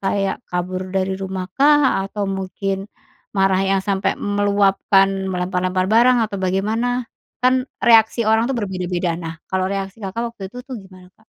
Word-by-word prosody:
kayak 195 0 -1
kabur 185 +1 -3
dari 190 0 0
rumah 190 -1 -4
kah, 290 -4 +4
atau 205 0 -3
mungkin 195 +1 -3 0.5
marah 195 -1 +3
yang 195 0 +2
sampai 195 -1 0
meluapkan, 195 -1 +2
melempar-lempar 185 0 -1
barang, 240 +3 +5
atau 205 -2 -5
bagaimana? 220 +7 0 0.4
Kan, 255 +1 +3 0.2
reaksi 230 0 +5
orang, 220 +1 +3
tuh, 270 - -1
berbeda-beda. 180 -4 -2
Nah, 165 -1 -6 0.2
kalau 185 0 0
reaksi 195 +1 -4
Kakak 200 +3 -4
waktu 220 - -13
itu, 250 +4 -9
tuh, 260 -2 -7
gimana, 185 -1 -15
Kak? 220 - -28
195 Hz, 155 wpm, -20 LUFS, 190-220 Hz, 0.5 s, barang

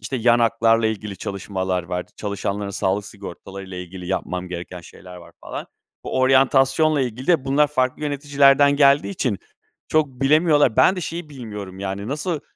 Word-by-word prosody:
işte, 115 +6 -4
yan 120 0 +3
haklarla 115 -1 +3
ilgili 105 -2 -4
çalışmalar 95 -1 -3
var, 90 +1 -4
çalışanların 100 -1 -3
sağlık 100 +1 -1
sigortalarıyla 95 -1 -9
ilgili 90 0 -8
yapmam 90 -1 -3
gereken 90 0 -7
şeyler 90 +2 -13
var 85 - -14
falan. - - -7 0.4
Bu - - -2
oryantasyonla 135 +3 +3
ilgili 125 0 -4
de 165 -7 +3
bunlar 140 +2 +3
farklı 130 -1 -1
yöneticilerden 145 -1 +3
geldiği 140 +4 +4
için 125 - -2 0.5
çok 155 -1 +2
bilemiyorlar. 145 0 +3
Ben 190 - +5
de - - -3
şeyi 170 -1 -5
bilmiyorum 105 -8 -8
yani, 100 +2 -4
nasıl 155 +3 -2
115 Hz, 155 wpm, -22 LUFS, 95-140 Hz, 0.5 s, Ben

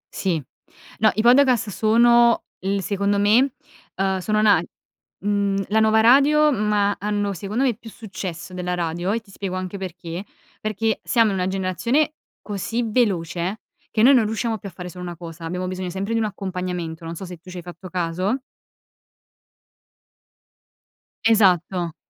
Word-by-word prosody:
Sì. 180 -5 0 0.6
No, 215 -1 +5
i 215 - +1
podcast 250 -2 +5
sono 235 +3 +4 0.2
il 195 0 -1
secondo 200 +1 0
me, 225 +7 +4 0.4
uhm, 190 0 0
sono 215 +3 +1
na 210 -2 +5 0.6
mhmm, 200 -1 0
la 220 - +3
nuova 220 0 +4
radio, 285 +6 +5
ma 210 -3 +1
hanno, 205 -1 -1
secondo 205 +7 -2
me, 255 -3 +2
più 225 +1 -12
successo 190 -5 -7
della 180 0 -2
radio 175 +2 -2
e 230 +1 -1
ti 200 -3 -19
spiego 190 -1 -5
anche 185 +1 -4
perché. 175 -1 -6 0.4
Perché 215 +1 -1
siamo 230 -4 +3
in 190 - -2
una 180 0 0
generazione 195 - 0 0.3
così 215 +4 -2
veloce, 195 -4 0 0.3
che 215 - +1
noi 270 +4 +8
non 240 -5 +4
riusciamo 220 0 -2
più 200 - -7
a - - -17
fare 180 +1 -8
solo 180 +1 -9
una 175 -1 -5
cosa, 165 -1 -9
abbiamo 180 +2 -3
bisogno 185 0 -4
sempre 195 +5 -3
di 230 - +1
un 220 - +1
accompagnamento, 180 -4 -4
non 165 +1 -5
so 190 - -7
se 180 -1 -9
tu 180 +3 -15
c'hai 180 -1 -7
fatto 175 +1 -10
caso. 180 +6 -1 2.9
Esatto, 185 -6 +3
200 Hz, 160 wpm, -22 LUFS, 180-220 Hz, 2.9 s, noi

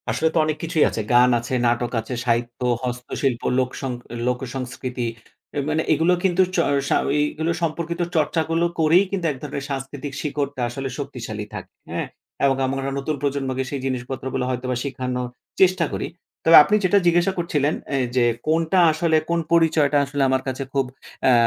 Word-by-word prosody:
আসলে 125 +8 +1
তো - - 0
অনেক 155 -1 -1
কিছুই 165 -2 +2
আছে। 110 - -3
গান 125 +1 +6
আছে, 120 +2 -6
নাটক 120 0 +1
আছে, 115 +3 -7
সাহিত্য, 120 0 0 0.2
হস্তশিল্প, 125 0 -2 0.2
লোক 130 -1 +1
সং 135 -2 -2 0.4
লোকসংস্কৃতি। 125 -1 -3 0.5
এ - - -3
মানে 155 +1 +1
এগুলো 165 +4 +3
কিন্তু 190 -1 +3
চ - - 0 0.3
সা - - +3
ওইগুলো 150 +3 0
সম্পর্কিত 170 +1 -2
চর্চা 160 +1 +2
গুলো 165 +1 +2
করেই 165 +4 +5
কিন্তু 190 -4 -2
১ 140 - -7
ধরনের 140 -1 -4
সাংস্কৃতিক 135 +1 -5
শিকড়টা 145 -2 -3
আসলে 135 +3 -4
শক্তিশালী 115 -6 -5
থাকে, - - -7 0.2
হ্যাঁ? - - -2 0.4
এবং 135 -1 +3
আমরা 135 +1 -1
একটা 135 0 -3
নতুন 150 +3 -2
প্রজন্মকে 135 -2 -1
সেই 140 -2 -4
জিনিসপত্রগুলো 130 0 -3
হয়তোবা 125 0 -2
শিখানোর 125 -2 -3 0.3
চেষ্টা 185 -2 +4
করি। - - -2 0.4
তবে 165 0 +8
আপনি 210 - +2
যেটা 185 +2 +4
জিজ্ঞাসা 175 +2 +3
করছিলেন 155 -4 0 0.2
অ্যা 140 - 0 0.2
যে 125 -2 +4 0.2
কোনটা 165 +3 +2
আসলে 160 0 +2
কোন 170 0 +2
পরিচয়টা 160 -3 +4
আসলে 145 0 -3
আমার 130 0 +2
কাছে 130 +1 -2
খুব 135 -1 +2 0.4
অ্যা 130 - +6
140 Hz, 170 wpm, -22 LUFS, 130-160 Hz, 0.5 s, তবে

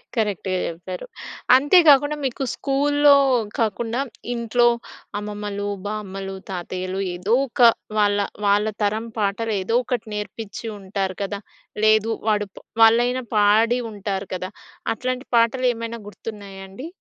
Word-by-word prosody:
కరెక్ట్‌గా 205 -4 -1
చెప్పారు. 175 +2 -6 0.5
అంతే 290 +7 +5
గాకుండా 290 +1 +6
మీకు 265 +1 -2
స్కూల్లో 290 +1 +4 0.4
కాకుండా 225 +3 -1 0.3
ఇంట్లో 240 +1 +2 0.5
అమ్మమ్మలు, 205 -1 -4 0.2
బామ్మలు, 195 -2 -5
తాతయ్యలు 185 +1 -4 0.2
ఏదో 185 +6 -1
ఒక 245 - -13 0.4
వాళ్ళ, 205 -1 +3 0.3
వాళ్ళ 205 +1 +3 0.2
తరం 215 +3 0
పాటలు 215 +2 -1
ఏదోకటి 240 +3 0
నేర్పిచ్చి 210 +2 -6
ఉంటారు 190 -1 -3
కదా! 200 +1 -4 0.5
లేదు. 215 +1 +4 0.2
వాడు 210 -1 +1
ప్ - - -28 0.3
వాళ్ళైనా 240 +3 +4
పాడి 220 +4 +4
ఉంటారు 200 -1 -4
కదా! 185 +1 -4 0.4
అట్లాంటి 255 +3 -4
పాటలేమైనా 235 -1 +1
గుర్తున్నాయా 200 -1 -9
అండి? 255 +11 -8
215 Hz, 115 wpm, -22 LUFS, 200-240 Hz, 0.5 s, గాకుండా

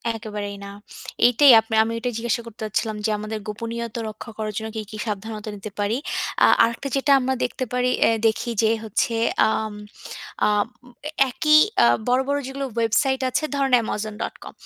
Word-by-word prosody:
একেবারেই 210 -2 -6
না। 200 - -8 0.5
এইটাই 250 +3 +7
আপ 220 - -4 0.2
আমি 225 +1 -3
এটাই 245 +1 -3
জিজ্ঞাসা 235 +1 -1
করতে 225 -1 -13
চাচ্ছিলাম 215 +1 -2
যে - - +2
আমাদের 215 +1 -5
গোপনীয়তা 230 +2 -5
রক্ষা 215 +2 -10
করার 215 -1 -3
জন্য 220 -1 -4
কি, 220 - -2
কি 215 - -7
সাবধানতা 215 +1 -5
নিতে 205 +1 -8
পারি? 205 +4 0 0.5
আ - - +6 0.2
আরেকটা 235 +4 -1
যেটা 275 +1 +1
আমরা 265 0 0
দেখতে 255 - -2
পারি, 250 0 +1 0.2
এহ 225 - +3
দেখি 225 +2 -1
যে 220 - +4
হচ্ছে 225 +2 -1 0.3
আ - - +3
আম 220 -1 -3 0.7
আ - - +3 0.8
একই 305 +4 +4 0.3
আ - - +6 0.2
বড়, 250 +1 +3
বড় 285 0 +1
যেগুলো 270 +1 -4
ওয়েবসাইট 235 +4 +1
আছে 310 - -1
ধরেন 275 -2 0
amazon.com। 210 0 -5
225 Hz, 170 wpm, -23 LUFS, 215-250 Hz, 0.8 s, এইটাই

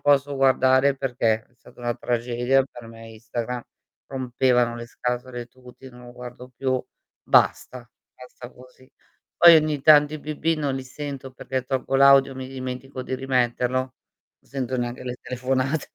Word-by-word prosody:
posso 145 0 +2
guardare 135 0 +3
perché 115 -4 0
è - - -34
stata 125 +1 -20
una 120 0 -2
tragedia 120 +3 0
per 120 -3 -13
me 115 0 -12
Instagram, 115 +2 -5 0.4
rompevano 125 -2 +1
le 120 0 -7
scatole 125 0 -4
tutti, 130 +1 -15
non 125 0 -14
lo 120 - -11
guardo 125 0 -10
più, 130 +1 -1 0.4
basta, 125 -2 +1 0.2
basta 125 -1 -12
così. 130 +1 -19 0.5
Poi 170 -1 +9
ogni 155 -2 +1
tanto 150 0 +6
i - - -5
bip-bip 155 +2 -2
non 140 -3 -1
li 135 - -4
sento 135 0 -7
perché 130 +1 -4
tolgo 135 0 -3
l'audio, 135 0 +6
mi 130 0 -6
dimentico 130 0 -6
di 130 - -4
rimetterlo, 125 -1 0
non 130 0 -4 0.5
sento 130 -1 -4
neanche 120 0 -4
le 125 0 -5
telefonate. 130 +4 -2
130 Hz, 155 wpm, -24 LUFS, 125-135 Hz, 0.5 s, Poi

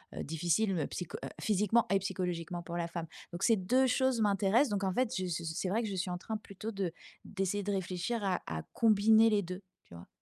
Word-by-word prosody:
heu, - - -4
difficile 170 +6 +1
me 155 -5 -1
psycho 180 - -5
heu, - - -4
physiquement 210 +2 +3
et 195 - +4
psychologiquement 175 -2 -3
pour 170 0 -5
la 170 -1 -1
femme. 170 -1 -5 0.3
Donc 175 +3 -5
ces 225 -2 +5
2 250 +8 +3
choses 260 -2 +2
m'intéressent 205 +5 +3
donc 200 -1 -1
en 190 -1 0
fait 255 +1 +1
je 185 - -1
ce 170 -1 -3
ce 160 - -3
c'est 185 - -1
vrai 225 +5 +1
que 220 - -2
je 195 - -3
suis 185 0 -2
en 180 - -2
train 220 +4 -4
plutôt 210 +1 -7
de 195 -5 -2 0.3
d'essayer 195 0 -1
de 205 - -1
réfléchir 190 +4 -2
à 185 -2 0
à 80 -1 -4
combiner 220 0 +5
les 205 -2 +2
2, 180 +3 -6 0.2
tu - - -17
vois? 85 - -11
195 Hz, 240 wpm, -32 LUFS, 175-220 Hz, 0.3 s, ces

